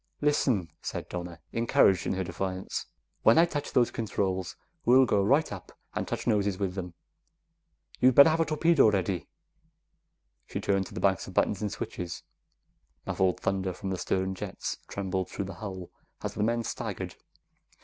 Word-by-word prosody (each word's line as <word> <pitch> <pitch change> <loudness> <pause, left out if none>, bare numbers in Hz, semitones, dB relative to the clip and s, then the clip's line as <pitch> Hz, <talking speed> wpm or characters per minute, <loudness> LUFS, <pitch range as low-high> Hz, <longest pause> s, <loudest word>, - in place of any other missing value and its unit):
"Listen," 130 - +1
said - - -5
Donna, 85 -1 -6
encouraged 115 -5 +3
in - - +1
her 95 0 -1
defiance, 95 +2 -4 0.3
"when 110 - +6
I 165 - +7
touch 145 -4 -4
those 120 -2 +3
controls, 95 -4 -2 0.3
we'll 130 +2 +6
go 105 -4 +2
right 140 +10 +3
up 95 - -9 0.2
and - - -2
touch - - -3
noses 100 -4 +1
with 95 -2 -1
them. 90 -3 -6 1.0
You'd 130 0 +5
better 140 +3 +9
have 160 - +1
a 165 - +3
torpedo 155 -4 +4
ready!" 95 -3 -1 1.2
She - - -4
turned 95 -1 0
to - - -12
the - - -3
banks - - +2
of - - -10
buttons 100 - +2
and 105 -2 -1
switches. 85 -2 -5 0.8
Muffled 95 -1 +1
thunder 95 -1 0
from 95 +2 -5
the 95 - -1
stern 95 0 0
jets 95 - -5
trembled 95 -2 -3
through 100 - -4
the 95 - -6
hull 95 -4 -6 0.3
as - - -3
the - - -3
men 115 +2 +1
staggered. - - -4
100 Hz, 170 wpm, -29 LUFS, 95-120 Hz, 1.2 s, better